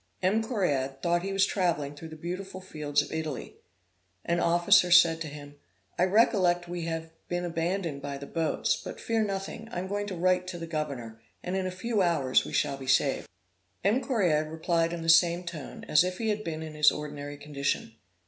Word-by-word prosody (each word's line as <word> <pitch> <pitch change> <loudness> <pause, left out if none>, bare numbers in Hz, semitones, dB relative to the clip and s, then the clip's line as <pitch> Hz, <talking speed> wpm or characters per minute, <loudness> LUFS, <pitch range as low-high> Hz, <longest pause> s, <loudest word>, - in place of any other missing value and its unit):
M. 200 +5 +3
Correard 145 - -1
thought 175 0 +2
he 195 +2 -3
was 195 0 +3
travelling 165 -8 0
through 160 +3 -9
the 160 - -9
beautiful 185 +4 -6
fields 150 -5 -1
of 145 - -10
Italy. 160 -4 -4 0.7
An 170 0 +1
officer 175 +3 +4
said 165 -2 +6
to 160 - -3
him 145 0 -10 0.4
'I 180 - +5
recollect 185 -4 +3
we 175 -1 -4
have 165 0 -4 0.2
been 175 0 -2
abandoned 170 -2 -2
by 140 0 -4
the 140 - -8
boats; 165 +2 0
but - - -7
fear 225 -1 0
nothing. 200 +3 -4
I - - -5
am 185 +1 -3
going 205 +1 -2
to 195 - -4
write 180 +1 +2
to 180 -1 -5
the 165 - -5
governor, 140 -9 -4 0.2
and 180 - -3
in 190 -1 -1
a - - -1
few 210 +4 -1
hours 160 -8 +3
we - - -7
shall 140 - 0
be 135 -1 -9
saved.' 130 - +2 0.6
M. 215 +7 +3
Correard 180 - +1
replied 165 +1 0
in 170 -1 -4
the - - -5
same 170 +1 +5
tone, 170 -5 -7
and - - -12
as 150 +2 +6
if 180 0 -3
he 225 -1 -1
had 215 0 -1
been 160 -3 -4
in 155 -1 -7
his 150 0 +5
ordinary 145 -1 -6
condition. 145 -5 -2
170 Hz, 205 wpm, -28 LUFS, 150-185 Hz, 0.7 s, said